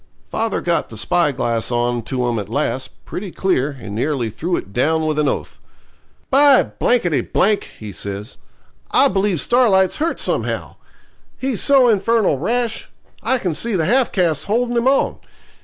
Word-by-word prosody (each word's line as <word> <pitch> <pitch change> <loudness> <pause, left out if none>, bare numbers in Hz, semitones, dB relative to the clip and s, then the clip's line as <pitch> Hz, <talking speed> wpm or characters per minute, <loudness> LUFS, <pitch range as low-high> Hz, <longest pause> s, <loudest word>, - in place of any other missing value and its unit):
Father - - -1
got - - 0
the - - -9
spyglass 130 -9 0
on 120 0 0
to 125 +2 -2
'em 120 -2 -1
at 100 -1 -6
last, 130 0 -3
pretty 195 +1 -6
clear, 150 -7 -1
and 100 - -8
nearly 120 0 -1
threw 170 - -2
it 100 - -6
down 160 +6 +1
with 155 -1 0
an 150 - +2
oath. - - -3 0.7
'By 280 0 +5 1.0
!' - - -22
he 105 -2 -8
says, 100 +2 -6 0.5
'I - - +5
believe 195 -2 0
Starlight's 200 - +3
hurt 325 +2 -1
somehow. - - -2 0.6
He's 260 -4 -2
so 275 -3 +5
infernal 215 - +2
rash. 235 - -1 0.3
I 260 - +1
can 185 -8 -2
see 225 +7 -2
the 165 -4 +1
half 250 +7 +2
caste 165 -6 0
holding 240 +3 0
him 235 +2 +1
on. 270 +1 +2
170 Hz, 155 wpm, -19 LUFS, -, 1.0 s, By